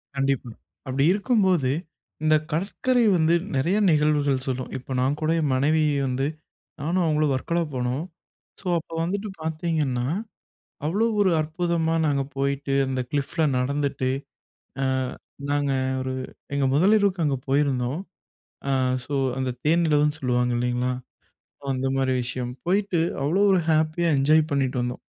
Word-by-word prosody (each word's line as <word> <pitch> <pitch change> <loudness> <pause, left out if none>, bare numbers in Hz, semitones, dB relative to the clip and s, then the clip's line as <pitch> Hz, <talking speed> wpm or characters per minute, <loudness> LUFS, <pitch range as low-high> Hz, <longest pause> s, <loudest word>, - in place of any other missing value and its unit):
கண்டிப்பா. 135 -3 0 0.3
அப்பிடி 135 +1 +1
இருக்கும்போது, 190 - +2 0.5
இந்த 155 0 +5 0.2
கடற்கரை 215 +9 +1
வந்து 160 0 +3 0.2
நிறைய 170 +10 +2
நிகழ்வுகள் 150 -4 +2
சொல்லும். 130 -1 -3
இப்ப 130 +1 -7
நான் 135 +3 +1
கூட 155 - 0
என் 145 -3 +1
மனைவி 155 +4 +2 0.2
வந்து 130 +2 0 0.5
நானும் 175 +5 +1
அவுங்களும் 155 -2 +2
வர்க்கலா 170 +6 -1
போனோம். 125 +4 -1 0.6
சோ, - - -23
அப்போ 165 - -13
வந்துட்டு 200 +5 -2
பாத்தீங்கன்னா, 155 -6 -1 0.8
அவ்வளவு 210 +8 +1
ஒரு 190 - +3
அற்புதமா 165 +1 0
நாங்க 140 -2 +1
போயிட்டு, 140 0 -1
அந்த 130 -1 -1
கிளிஃப் 145 -2 -2
ல - - +5
நடந்துட்டு 140 0 -1 0.7
அ - - +2 0.6
நாங்க 145 -1 +1 0.3
ஒரு 130 0 -3 0.4
எங்க 140 -1 +1
முதலிரவுக்கு 195 +3 +3
அங்க 140 -2 +1
போயிருந்தோம். 135 0 +1 0.7
அ - - +1 0.3
சோ, 145 - -4 0.2
அந்த 130 -1 -1
தேனிலவுன்னு 150 -2 +3
சொல்லுவாங்க 125 -1 +1
இல்லேங்களா? 125 +1 0 0.7
சோ, - - -19
அந்த 130 +1 -2
மாரி 135 -1 +1
விஷயம். 125 0 -4
போயிட்டு 190 -1 +1 0.2
அவ்வளவு 180 +9 +3
ஒரு 185 - +4
ஹேப்பியா 155 +2 +2
என்ஜாய் 155 +3 +5
பண்ணிட்டு 135 -2 0
வந்தோம். 125 +1 -4
145 Hz, 135 wpm, -24 LUFS, 130-165 Hz, 0.8 s, இந்த